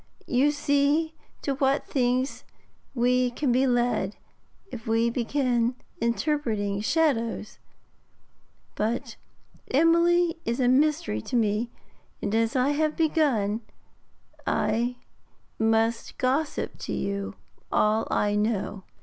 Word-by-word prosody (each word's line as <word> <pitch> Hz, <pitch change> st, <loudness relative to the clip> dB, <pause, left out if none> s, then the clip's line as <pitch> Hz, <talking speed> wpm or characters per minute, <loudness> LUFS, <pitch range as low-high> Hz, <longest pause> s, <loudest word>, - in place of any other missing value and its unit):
You 260 Hz, +4 st, +3 dB
see 290 Hz, +2 st, +1 dB, 0.3 s
to 275 Hz, -, 0 dB
what 270 Hz, +1 st, +1 dB
things 255 Hz, 0 st, 0 dB, 0.5 s
we 250 Hz, +1 st, +3 dB
can 250 Hz, +2 st, -1 dB
be 260 Hz, +2 st, +3 dB
led, 240 Hz, -5 st, +1 dB, 0.6 s
if 225 Hz, -3 st, -8 dB
we 225 Hz, +1 st, +2 dB
begin 245 Hz, -1 st, 0 dB, 0.3 s
interpreting 230 Hz, -5 st, 0 dB
shadows; 230 Hz, -6 st, 0 dB, 1.1 s
but 225 Hz, +3 st, -2 dB, 0.5 s
Emily 335 Hz, +3 st, +3 dB
is 235 Hz, +2 st, -2 dB
a 250 Hz, -, +3 dB
mystery 260 Hz, -, +2 dB
to 245 Hz, -, -5 dB
me, 220 Hz, 0 st, +1 dB, 0.5 s
and, 205 Hz, -, -3 dB
as 225 Hz, +2 st, +1 dB
I 260 Hz, +2 st, +3 dB
have 305 Hz, +1 st, 0 dB
begun, 265 Hz, -10 st, +1 dB, 0.9 s
I 240 Hz, +2 st, +1 dB, 0.6 s
must 225 Hz, +1 st, +1 dB
gossip 275 Hz, +4 st, -1 dB
to -, -, -4 dB
you 200 Hz, 0 st, -3 dB, 0.4 s
all 215 Hz, +1 st, +2 dB
I 205 Hz, 0 st, +1 dB
know.' 210 Hz, -2 st, -1 dB
245 Hz, 105 wpm, -26 LUFS, 225-285 Hz, 1.1 s, You